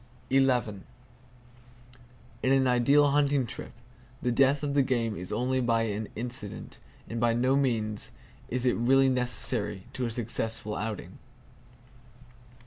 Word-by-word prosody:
In 135 0 +5 1.9
an 135 0 +3
ideal 140 +4 +4
hunting 145 -2 +2
trip, - - -7 0.5
the 125 - -1
death 135 +3 +3
of 145 -1 -1
the 140 - +4
game 120 -5 0
is 90 0 -7
only 125 +4 0 0.3
an 105 +1 -4
incident; 120 -2 -4 0.3
and 115 - -4
by 120 0 +3
no 130 +3 +2
means 110 -6 0 0.4
is 125 +1 -1
it 125 - +2
really 135 +3 +4
necessary 120 -5 -1
to 125 -2 -2
a - - -3
successful 110 -2 -2
outing. 110 -2 -5
125 Hz, 125 wpm, -28 LUFS, 115-135 Hz, 1.9 s, In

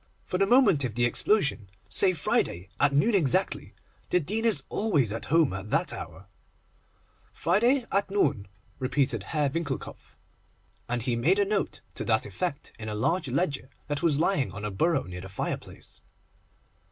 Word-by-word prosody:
For 180 - -2
the 195 - +3
moment 205 - +5
of 120 -4 -3
the 120 0 +2
explosion, 140 - +1 0.2
say 190 -1 +4
Friday 95 - -1
at 145 - +4
noon 170 +12 +3
exactly. 160 -10 0 0.3
The 180 - +3
Dean 215 +8 -2
is 225 - +1
always 150 - +1
at 115 - -5
home 160 - +3
at 95 +2 -6
that - - +1
hour.' 95 - -8 1.1
'Friday, 235 +9 +2
at 200 0 +1
noon,' 140 - +1 0.3
repeated 130 -3 0
Herr 150 +6 0
Winckelkopf, 145 -4 -5 0.7
and 120 -1 -1
he 125 -2 0
made 160 +12 +2
a 205 - +3
note 200 0 -2
to - - -4
that 110 -1 +2
effect 140 - -4
in 110 -1 -5
a 105 - -3
large 165 +10 0
ledger 140 -1 -1 0.2
that 145 -1 -2
was 160 -4 +2
lying 155 - +1
on 105 +2 -6
a 105 - -3
bureau 140 - +1
near 90 0 -8
the 95 - -9
fireplace. 95 - -6
145 Hz, 165 wpm, -27 LUFS, 115-185 Hz, 1.1 s, moment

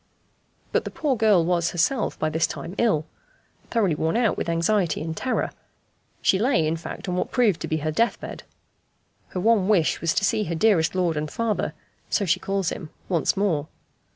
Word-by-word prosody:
But - - +1
the - - -5
poor 290 -4 -1
girl 210 -7 +4
was 175 -1 +1
herself, 200 +8 0
by 155 - 0
this 160 +1 +2
time, 170 - -6
ill 180 -10 +2 0.6
thoroughly 210 -8 +2
worn 160 +6 0
out 235 -3 +2
with - - -3
anxiety 170 +1 +1
and 160 0 -4
terror; 255 - -1 0.7
she 190 - +4
lay, 225 - +2
in 155 +1 0
fact, 165 +4 -7
on 180 - -1
what 180 - -1
proved 225 -9 +2
to - - -3
be 155 - 0
her 155 - +1
death 230 +10 +1
bed. - - -7 0.9
Her 185 - -5
one 210 -1 +3
wish 190 -7 +2
was 165 -1 +1
to 195 - +2
see 210 +3 +1
her 170 - -2
dearest 175 -2 +3
lord 175 -4 +1
and 150 0 -2
father, 230 +2 -1 0.3
so 205 - +1
she 170 - +2
calls 195 -3 -1
him, 155 - -6 0.2
once 175 +1 +1
more. 165 -7 +1
180 Hz, 195 wpm, -24 LUFS, 160-215 Hz, 0.9 s, girl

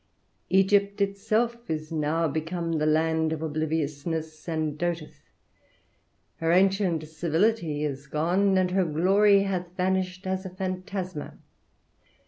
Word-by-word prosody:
Egypt 200 +1 +3
itself 220 +4 0
is 155 0 -3
now 160 +1 0
become 165 +2 -2
the 155 - +1
land 160 +1 +2
of 160 0 -3
obliviousness, 155 +1 -3
and 155 -2 -1
doteth. 170 -1 -4 1.1
Her 165 0 0
ancient 185 -3 +2
civility 160 0 0
is 140 -1 -4
gone, 180 +7 +2
and 185 -1 +2
her 190 0 +3
glory 195 +5 +4
hath 180 -2 -3
vanished 185 0 -1
as 190 0 -2
a 190 - -6
phantasma. 185 -2 -5
175 Hz, 115 wpm, -27 LUFS, 155-190 Hz, 1.1 s, glory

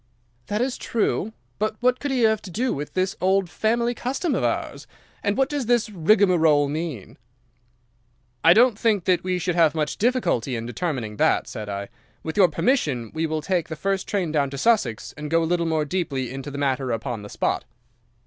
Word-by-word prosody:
"'That 210 +2 -1
is 255 0 -1
true. 225 -1 -1 0.3
But 215 0 0
what 250 +1 +2
could 285 - -3
he 260 -2 0
have 220 -2 +3
to 195 - -9
do 240 +8 -1
with 145 +1 -6
this 185 +1 0
old 190 -1 +2
family 235 +2 +1
custom 270 +7 -2
of - - 0
ours, - - -2 0.3
and 205 +2 0
what 270 -1 +3
does 285 -5 -3
this 240 -2 +2
rigmarole 170 -5 +4
mean?' 150 - -5 1.2
"'I 165 +2 +8
don't 230 0 +4
think 215 -5 +2
that 180 0 +2
we 185 0 0
should 180 0 -1
have 165 -2 +3
much 155 -1 -1
difficulty 190 - +1
in 115 0 -4
determining 120 -6 -3
that,' - - +2
said 105 -1 -6
I; 100 0 -4 0.4
'with 160 - -4
your 195 -3 +6
permission 155 - 0
we 160 0 -1
will 155 -1 -3
take 175 -2 0
the 160 - -4
first 195 +4 -2
train 190 -6 -1
down 145 -3 +1
to 140 - -6
Sussex, 135 - +1
and 150 0 -5
go 165 +1 +2
a - - +1
little 170 0 0
more 160 -2 +1
deeply 140 -7 -2
into 135 +1 -6
the 140 - -7
matter 135 -2 0
upon 115 0 -3
the 105 - -9
spot. - - -1
175 Hz, 200 wpm, -24 LUFS, 145-215 Hz, 1.2 s, I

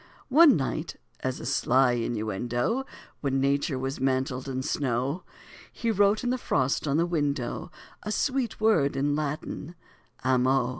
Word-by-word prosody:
One 295 +1 +7
night, 135 - -3 0.2
as 130 -1 -3
a - - -7
sly 130 0 +3
innuendo, 120 - -1 0.3
When 135 -2 0
Nature 140 +1 +1
was 135 +1 -3
mantled 130 0 -1
in 130 0 -3
snow, 135 +5 -1 0.5
He 230 -1 -1
wrote 205 +1 +3
in 245 - 0
the 255 - -1
frost 135 - 0
on 140 +1 +2
the 170 - +3
window, 145 -7 -2 0.3
A 210 - -4
sweet 260 +1 -1
word 175 -12 +3
in 145 +1 +1
Latin 155 +2 -4 0.5
"amo." 130 0 +2
140 Hz, 145 wpm, -27 LUFS, 130-175 Hz, 0.5 s, One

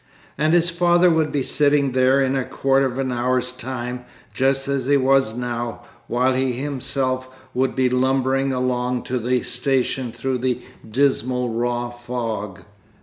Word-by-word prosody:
And 155 +3 +2
his 170 0 +3
father 175 +1 +4
would 160 -2 +1
be 140 -2 0
sitting 145 -1 +2
there 130 +1 +3
in 135 0 +1
a 135 - 0
quarter 135 +1 +1
of 125 0 -6
an 135 -1 -1
hour's 125 +1 0
time, 125 -1 -5 0.3
just 135 +1 +1
as 140 -2 -1
he 145 0 +4
was 135 -4 +2
now, 120 -1 -4 0.2
while 125 +2 +2
he 130 0 0
himself 130 -1 -2 0.2
would 130 +1 0
be 130 -1 +2
lumbering 130 +1 +1
along 125 -1 -1
to 125 0 -2
the 125 +2 0
station 130 -1 0
through 125 +2 -2
the 125 0 0 0.3
dismal 125 0 +1
raw 120 +1 -2
fog! 115 -5 -5
130 Hz, 155 wpm, -22 LUFS, 125-135 Hz, 0.3 s, father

